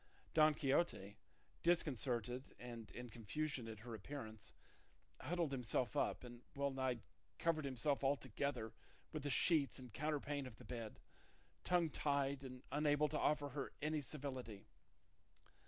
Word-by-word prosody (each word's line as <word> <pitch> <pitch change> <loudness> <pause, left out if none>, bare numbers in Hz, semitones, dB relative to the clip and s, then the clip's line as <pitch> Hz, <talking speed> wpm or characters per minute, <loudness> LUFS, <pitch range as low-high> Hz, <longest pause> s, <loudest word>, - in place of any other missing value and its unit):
Don 155 -1 +7
Quixote, 135 - +1 0.4
disconcerted 130 -7 +1
and 120 -2 -7
in 125 0 -7
confusion 125 +3 -2
at 110 -1 -6
her 120 0 -6
appearance, 110 -1 -6 0.7
huddled 165 +1 0
himself 125 +1 +1
up 145 - +1
and 120 -1 -9
well 140 0 +1
nigh 130 -3 0 0.4
covered 160 -3 +2
himself 140 +2 +1
altogether 135 -3 0 0.4
with 155 - -2
the 145 - -1
sheets 145 +1 +4
and 125 -4 -9
counterpane 145 -2 -1
of 120 - -9
the 125 - -13
bed, 115 -2 -5 0.6
tongue 175 -3 +3
tied, 140 -1 +1
and 130 -1 -7
unable 150 0 +4
to 150 - 0
offer 145 -1 +3
her 140 0 -3
any 150 0 +1
civility. 130 -7 -5
135 Hz, 135 wpm, -42 LUFS, 120-150 Hz, 0.7 s, Don